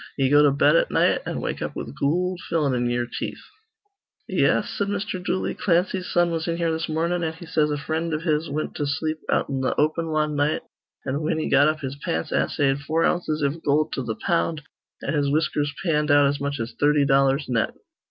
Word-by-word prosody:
Ye 135 Hz, -1 st, +2 dB
go 145 Hz, 0 st, +7 dB
to 145 Hz, -1 st, +5 dB
bed 140 Hz, -, +4 dB
at -, -, +3 dB
night, -, -, +2 dB
an' -, -, -3 dB
wake -, -, -3 dB
up -, -, -4 dB
with -, -, -6 dB
goold 180 Hz, +5 st, 0 dB
fillin' 150 Hz, -5 st, +1 dB
in 120 Hz, -1 st, 0 dB
ye'er 120 Hz, 0 st, 0 dB
teeth." 120 Hz, -, -6 dB, 0.8 s
"Yes," -, -, +2 dB
said 200 Hz, -, -2 dB
Mr. 200 Hz, -2 st, -3 dB
Dooley, 185 Hz, -, -1 dB
"Clancy's 180 Hz, 0 st, 0 dB
son 175 Hz, -1 st, +2 dB
was 165 Hz, 0 st, -2 dB
in 170 Hz, 0 st, -1 dB
here 170 Hz, -1 st, 0 dB
this 160 Hz, 0 st, -2 dB
mornin', 170 Hz, +2 st, 0 dB
an' 160 Hz, -1 st, -1 dB
he 165 Hz, +2 st, -11 dB
says 155 Hz, -2 st, +1 dB
a 145 Hz, -, -1 dB
frind 160 Hz, +3 st, -2 dB
iv 155 Hz, +1 st, -2 dB
his 155 Hz, -1 st, 0 dB
wint 155 Hz, +2 st, -3 dB
to 145 Hz, -, -1 dB
sleep 155 Hz, +2 st, -2 dB
out -, -, +1 dB
in 135 Hz, -1 st, -2 dB
th' 130 Hz, -, 0 dB
open 160 Hz, +2 st, +1 dB
wan 155 Hz, -1 st, 0 dB
night, 145 Hz, +2 st, 0 dB, 0.4 s
an' 135 Hz, +2 st, -1 dB
whin 155 Hz, +1 st, 0 dB
he 160 Hz, -, -2 dB
got 145 Hz, +2 st, +6 dB
up 155 Hz, 0 st, 0 dB
his 135 Hz, 0 st, -5 dB
pants 80 Hz, -, -3 dB
assayed 135 Hz, -1 st, +1 dB
four 155 Hz, +3 st, 0 dB
ounces 155 Hz, -4 st, 0 dB
iv 145 Hz, +4 st, -1 dB
goold 150 Hz, +2 st, +1 dB
to 135 Hz, -, -2 dB
th' 110 Hz, -2 st, -4 dB
pound, 165 Hz, -2 st, 0 dB, 0.4 s
an' -, -, -2 dB
his 145 Hz, -2 st, +1 dB
whiskers 150 Hz, -1 st, 0 dB
panned 150 Hz, -3 st, +1 dB
out 145 Hz, 0 st, +6 dB
as 140 Hz, +1 st, 0 dB
much 140 Hz, -1 st, -2 dB
as 115 Hz, +1 st, -4 dB
thirty 145 Hz, 0 st, +4 dB
dollars 135 Hz, +1 st, +3 dB
net." 115 Hz, -3 st, 0 dB
150 Hz, 225 wpm, -24 LUFS, 140-165 Hz, 0.8 s, go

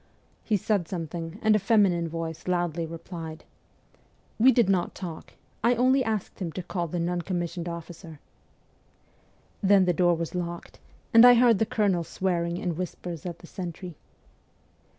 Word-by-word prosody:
He 215 Hz, -, +1 dB
said 195 Hz, -3 st, 0 dB
something, 165 Hz, 0 st, -5 dB
and 215 Hz, -1 st, +5 dB
a -, -, +3 dB
feminine 195 Hz, -5 st, +2 dB
voice 165 Hz, 0 st, -5 dB
loudly 175 Hz, -2 st, -1 dB
replied: 165 Hz, -1 st, -8 dB, 0.5 s
' -, -, -36 dB
We 255 Hz, +4 st, +7 dB
did 240 Hz, -6 st, +3 dB
not 190 Hz, -3 st, 0 dB
talk. 170 Hz, -4 st, -8 dB, 0.3 s
I 240 Hz, +2 st, +4 dB
only 260 Hz, +2 st, +3 dB
asked 220 Hz, -4 st, -3 dB
him 175 Hz, -4 st, -3 dB
to 185 Hz, -, -5 dB
call 175 Hz, -1 st, -3 dB
the 175 Hz, -, -4 dB
non 175 Hz, +1 st, -1 dB
commissioned 175 Hz, -1 st, -3 dB
officer.' 170 Hz, -1 st, -9 dB, 1.4 s
Then 195 Hz, -1 st, +5 dB
the 180 Hz, -, +2 dB
door 175 Hz, +1 st, +3 dB
was 165 Hz, 0 st, -4 dB
locked, 170 Hz, -1 st, -5 dB, 0.3 s
and 230 Hz, 0 st, +9 dB
I 245 Hz, 0 st, +9 dB
heard 235 Hz, -4 st, +5 dB
the 220 Hz, -, +1 dB
colonel 205 Hz, -8 st, +1 dB
swearing 170 Hz, -1 st, -2 dB
in 180 Hz, -4 st, -2 dB
whispers 180 Hz, -2 st, -5 dB
at 170 Hz, -1 st, -6 dB
the -, -, -14 dB
sentry. 175 Hz, -1 st, -7 dB
175 Hz, 160 wpm, -26 LUFS, 170-200 Hz, 1.4 s, and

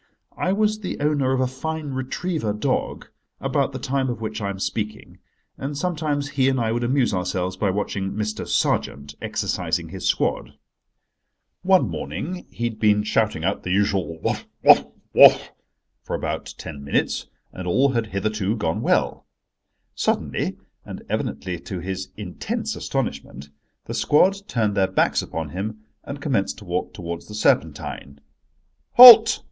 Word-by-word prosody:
I 185 Hz, -, -1 dB
was 215 Hz, +1 st, +1 dB
the 195 Hz, -, -5 dB
owner 145 Hz, -3 st, +1 dB
of 130 Hz, -1 st, +1 dB
a -, -, +2 dB
fine 150 Hz, +3 st, -4 dB
retriever 130 Hz, -, -2 dB
dog 105 Hz, -, -2 dB, 0.3 s
about -, -, 0 dB
the -, -, -5 dB
time 135 Hz, 0 st, -1 dB
of 120 Hz, -, -4 dB
which 110 Hz, -1 st, -5 dB
I 100 Hz, -, -2 dB
am 100 Hz, -, -5 dB
speaking, 105 Hz, +2 st, -5 dB, 0.4 s
and 140 Hz, +1 st, -4 dB
sometimes 150 Hz, -4 st, -2 dB
he 135 Hz, -2 st, +2 dB
and 130 Hz, -1 st, 0 dB
I 115 Hz, -1 st, 0 dB
would 120 Hz, +1 st, -1 dB
amuse 125 Hz, -1 st, +1 dB
ourselves 90 Hz, 0 st, -2 dB
by 100 Hz, +1 st, 0 dB
watching 95 Hz, 0 st, -2 dB
Mr. 105 Hz, 0 st, -3 dB
Sergeant 70 Hz, 0 st, -1 dB
exercising -, -, -2 dB
his -, -, -4 dB
squad. -, -, -1 dB, 1.1 s
One 185 Hz, -8 st, +4 dB
morning 90 Hz, -, -5 dB
he 120 Hz, -, -7 dB
had 115 Hz, -2 st, -2 dB
been 105 Hz, -1 st, +3 dB
shouting 105 Hz, -6 st, 0 dB
out 95 Hz, +3 st, -1 dB
the -, -, -6 dB
usual 95 Hz, -3 st, 0 dB
"Whough, -, -, -1 dB, 0.2 s
whough, -, -, +6 dB, 0.2 s
whough!" -, -, +8 dB, 0.6 s
for -, -, -4 dB
about -, -, -4 dB
ten 70 Hz, -1 st, -8 dB
minutes, 70 Hz, -, -1 dB, 0.3 s
and 90 Hz, -1 st, -6 dB
all 130 Hz, +10 st, +3 dB
had 115 Hz, -4 st, -1 dB
hitherto 105 Hz, +1 st, -1 dB
gone 85 Hz, -7 st, -2 dB
well. -, -, 0 dB, 0.7 s
Suddenly, -, -, -1 dB, 0.3 s
and -, -, -9 dB
evidently 90 Hz, -2 st, -3 dB
to 95 Hz, +1 st, -6 dB
his 95 Hz, +2 st, -5 dB
intense -, -, -4 dB
astonishment, 70 Hz, +1 st, -4 dB, 0.4 s
the -, -, -6 dB
squad 185 Hz, +6 st, +3 dB
turned 110 Hz, -, 0 dB
their 95 Hz, -2 st, +3 dB
backs -, -, +1 dB
upon 80 Hz, -2 st, -5 dB
him 105 Hz, +6 st, -5 dB, 0.2 s
and 140 Hz, 0 st, -7 dB
commenced 125 Hz, -10 st, -1 dB
to 105 Hz, -, -12 dB
walk 90 Hz, 0 st, -2 dB
towards 85 Hz, -2 st, -7 dB
the 105 Hz, -, -9 dB
Serpentine. 70 Hz, -6 st, -1 dB, 0.7 s
"Halt!" 235 Hz, -2 st, +10 dB
110 Hz, 155 wpm, -23 LUFS, 95-140 Hz, 1.1 s, Halt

